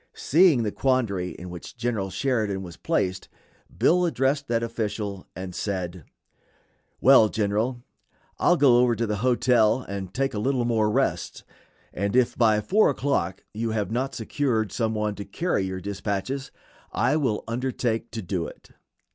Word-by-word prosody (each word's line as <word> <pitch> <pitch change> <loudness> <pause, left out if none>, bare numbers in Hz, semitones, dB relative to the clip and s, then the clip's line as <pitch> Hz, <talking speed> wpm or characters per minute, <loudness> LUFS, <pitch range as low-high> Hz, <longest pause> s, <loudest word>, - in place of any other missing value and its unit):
Seeing 160 -5 +4
the 105 - -1
quandary 110 -10 0
in 90 +1 -9
which 90 +8 -9
General 115 -5 -1
Sheridan 105 -2 -1
was 85 -2 -9
placed, 95 +2 -1 0.5
Bill 180 +2 +4
addressed 140 -1 0
that 115 0 0
official, 105 -4 -4
and 95 0 -6
said: 90 -4 -4 0.9
"Well, 130 -5 +6
General, 110 +4 -1 0.6
I'll 175 - +4
go 130 -5 +6
over 125 -1 +3
to 115 - -1
the 105 -1 -2
hotel 120 0 +3
and 95 -2 -6
take 135 0 -1
a 105 - -2
little 125 +1 0
more 110 -3 +2
rest, - - -1 0.5
and 100 +4 -2
if 125 -2 +3
by 110 -3 +3
4 205 - +3
o'clock 130 -10 -1
you 115 +2 -2
have 105 -2 -2
not 130 +4 -2
secured 115 -2 -1
some 110 -2 -1
one 105 -1 -1
to 100 - -7
carry 100 - -1
your 95 0 -4
dispatches, 100 +7 -3 0.4
I 145 - +1
will 130 -9 0
undertake 120 -1 -2
to 110 -2 -6
do 90 -2 -2
it." - - -14
110 Hz, 155 wpm, -25 LUFS, 100-130 Hz, 0.9 s, Well